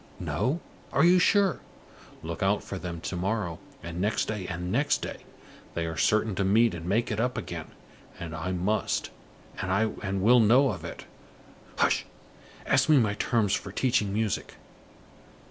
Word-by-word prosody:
No? 145 +7 -1 0.3
Are 140 - +3
you 180 +1 +6
sure? 200 0 +3 0.6
Look 85 +3 -5
out 100 +1 +2
for 95 - -6
them 85 -3 -6
to 90 - -4
morrow, 95 -2 -2 0.2
and 85 +1 -5
next 105 +2 0
day, 105 -4 -3
and 90 +2 -4
next 140 +7 +1
day. - - -5 0.6
They 85 - -1
are 80 0 -4
certain 110 +5 +2
to 100 - +1
meet 110 +3 +4
and 85 0 -6
make 110 +5 +1
it 105 - -2
up 125 +2 0
again, - - -5 0.5
and 85 -2 -6
I 85 +3 -3
must 95 +4 -1 0.5
and 100 0 -1
will 120 +3 +6
know 125 +5 +5
of 95 - -7
it. - - -8 0.7
Hush! - - +2 0.6
Ask - - +3
me 155 - +7
my 110 -5 +3
terms 105 -1 +1
for 100 - -2
teaching 110 -2 +1
music. 105 -2 -2
105 Hz, 160 wpm, -28 LUFS, 90-115 Hz, 0.7 s, me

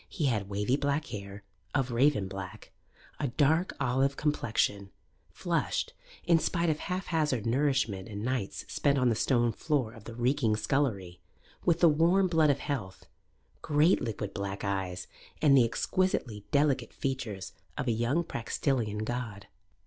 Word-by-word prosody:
He 155 - -2
had 105 -7 0
wavy 105 +6 0
black 145 +1 0
hair, 100 -2 -7 0.3
of 135 -3 +1
raven 120 -4 +3
black, 95 -1 -8 0.5
a 145 - 0
dark 155 +7 +2
olive 135 +1 +1
complexion, 110 -8 0 0.4
flushed, - - -1 0.3
in 170 -1 +4
spite 170 +1 +1
of 150 - -3
haphazard 160 - -1
nourishment 120 -6 +1
and 105 +1 -5
nights 125 -6 -2
spent 140 -1 +1
on 125 -2 +3
the 115 - +2
stone 120 0 +2
floor 130 -5 -1
of 110 -3 -14
the 115 - -8
reeking 120 -2 +1
scullery, 105 -7 -1 0.4
with 170 -1 +2
the 170 - +8
warm 170 +5 +4
blood 160 -3 +3
of 140 - +3
health, 110 -10 -4 0.6
great 150 +4 +3
liquid 105 -3 -4
black 100 0 -4
eyes, 95 -3 -2 0.3
and 145 -3 +5
the 125 -3 +6
exquisitely 115 - -1
delicate 140 -5 +1
features 105 -8 -4 0.2
of - - -2
a - - +3
young 120 +9 +1
Praxitelean 115 -6 -2
god. 115 -4 -4
125 Hz, 150 wpm, -30 LUFS, 105-145 Hz, 0.6 s, the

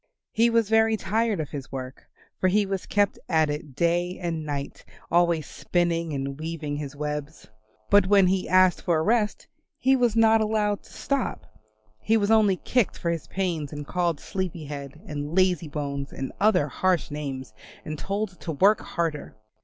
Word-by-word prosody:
He 230 +2 +3
was 230 -2 +2
very 220 0 +3
tired 215 +1 0
of 155 - -4
his 140 -2 -7
work 130 -1 -7 0.3
for 185 - +3
he 205 +3 +3
was 195 -1 -4
kept 205 -1 +1
at 160 -3 +3
it 150 -3 -6
day 175 +3 +1
and 170 -3 -3
night 145 -2 -5 0.3
always 170 -2 +3
spinning 170 -2 -1
and 140 0 -4
weaving 155 -2 -4
his 145 -2 -6
webs. 150 0 -5 0.4
But 205 -2 +6
when 200 -1 +6
he 185 0 0
asked 185 0 +4
for 170 -2 +1
a 155 - +1
rest 215 +1 +1 0.3
he 265 +1 +3
was 240 -4 +2
not 225 -1 +5
allowed 210 -1 0
to - - -17
stop; 275 -3 -2 0.5
he 225 - +2
was 205 0 +1
only 210 -4 +4
kicked 245 +1 0
for 170 - -1
his 165 -3 -4
pains 170 -7 -2
and 145 -1 -6
called 170 -2 -1
Sleepy 185 -5 -4
Head, 140 0 -7
and 145 +1 -5
Lazy 180 -4 +3
bones 140 -2 -4
and 135 - -5
other 205 -7 +3
harsh 180 +2 0
names, 135 -5 -5 0.3
and 155 -1 -5
told 195 0 -3
to 165 - -4
work 200 +8 +4
harder. 165 -4 -3
175 Hz, 175 wpm, -26 LUFS, 150-205 Hz, 0.5 s, But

